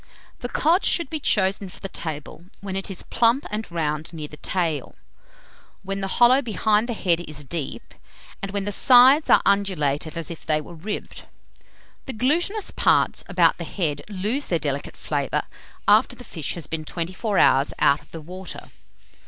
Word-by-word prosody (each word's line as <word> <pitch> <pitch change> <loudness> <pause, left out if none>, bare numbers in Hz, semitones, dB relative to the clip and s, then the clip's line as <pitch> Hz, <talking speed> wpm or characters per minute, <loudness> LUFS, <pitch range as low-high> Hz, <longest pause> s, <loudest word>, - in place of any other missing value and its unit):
The 245 - -5
cod 335 +9 +2
should 340 -6 +2
be 315 - -2
chosen 195 -6 +1
for - - -13
the 195 - -5
table 160 -1 -6
when 195 -1 -6
it 195 +1 -3
is 190 - -6
plump 235 +4 +2
and 215 +1 -3
round 155 -1 -2
near 155 -2 -6
the 150 - -12
tail, 165 -2 -2 0.9
when 195 +1 -4
the 195 - -2
hollow 250 +3 +6
behind 220 -1 +1
the 235 - -2
head 175 -5 +1
is 150 -3 -5
deep, 150 0 -5 0.5
and 195 - -4
when 200 0 -2
the 205 - -2
sides 260 +7 +6
are - - +6
undulated 165 -6 0
as 165 -1 -4
if 165 - -9
they 155 -1 +1
were 155 +3 -10
ribbed. 180 +6 -6 0.8
The 265 - -4
glutinous 340 - 0
parts - - +2
about - - +3
the - - -3
head 150 -7 -2
lose 210 +8 -2
their 170 - +1
delicate 145 -3 -3
flavour, - - -1 0.4
after - - +4
the - - -11
fish 155 -4 -4
has 170 -4 -6
been 155 +1 -4
twenty 170 +3 -4
four 205 0 -2
hours 135 +2 +4
out 140 +1 +3
of - - -23
the 165 - -8
water. 180 +3 -9
190 Hz, 180 wpm, -23 LUFS, 160-220 Hz, 0.9 s, hollow